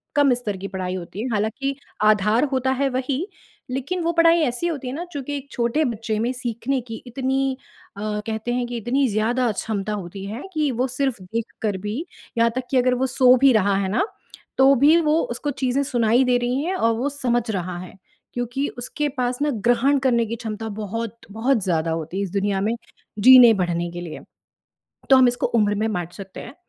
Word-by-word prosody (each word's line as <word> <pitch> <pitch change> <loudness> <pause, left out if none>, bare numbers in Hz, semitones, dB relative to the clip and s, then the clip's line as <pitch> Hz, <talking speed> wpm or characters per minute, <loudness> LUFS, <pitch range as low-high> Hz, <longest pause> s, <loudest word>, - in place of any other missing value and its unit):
कम 285 -3 +5
स्तर 225 -5 -3
की 195 +1 -6
पढ़ाई 185 -1 -3
होती 185 +3 -6
है। 245 - -2
हालाँकि 220 +7 -1 0.3
आधार 215 +3 +4
होता 260 0 +1
है 280 - +2
वही, 265 +6 -2 0.4
लेकिन 280 +8 -2
वो 335 - +1
पढ़ाई 335 0 +5
ऐसी 250 +5 -1
होती 290 -6 -4
है 250 - -4
ना, 335 - -4
चूँकि 285 0 -4
एक 280 0 -10
छोटे 240 +6 +1
बच्चे 225 -3 -2
में 235 +3 0
सीखने 250 +1 -2
की 225 - -6
इतनी 265 +1 -1 0.4
अ, - - -6 0.3
कहते 220 +2 -2
हैं 245 0 0
कि 240 0 -4
इतनी 260 +5 +1
ज़्यादा 230 +3 +1
क्षमता 210 0 -3
होती 195 -1 -6
है 215 +6 -6
कि 305 -2 +1
वो 250 +2 0
सिर्फ़ 260 -4 -2
देखकर 215 0 -3
भी, 210 +1 -2 0.4
यहाँ 230 0 +4
तक 255 - -1
कि 265 - +3
अगर 255 0 +3
वो - - +2
सो 255 -1 +5
भी 275 -1 +7
रहा 200 -2 +3
है 195 -1 0
ना, 380 - +2 0.5
तो 270 +1 +6
भी 310 +3 +7
वो 310 0 +2
उसको 285 +5 -3
चीज़ें 260 +2 +2
सुनाई 240 -2 +2
दे 250 -1 +3
रही 250 +3 -1
हैं 365 +4 -1
और 230 -10 +2
वो 260 +5 0
समझ 245 -4 0
रहा 180 -3 -3
है। 185 +1 -10 0.4
क्योंकि 245 +4 -2
उसके 295 +5 -2
पास 250 +1 -1
ना, 295 - +2
ग्रहण 245 +5 +2
करने 245 -3 +2
की 230 - -3
क्षमता 220 -1 -5
बहुत-बहुत 225 +2 -2
ज़्यादा 165 -3 0
होती 165 +2 -4
है, 200 - 0
इस 190 - -5
दुनिया 200 0 0
में 220 +4 0 0.4
जीने-बढ़ने 200 -8 +6
के 175 0 -6
लिए। 170 -3 -7 0.9
तो 265 - +8
हम 260 -1 +6
इसको 245 0 0
उम्र 210 -1 +2
में 220 +2 0
बाँट 175 -2 -3
सकते 195 -2 -9
हैं। 245 - -10
240 Hz, 200 wpm, -22 LUFS, 210-265 Hz, 0.9 s, तो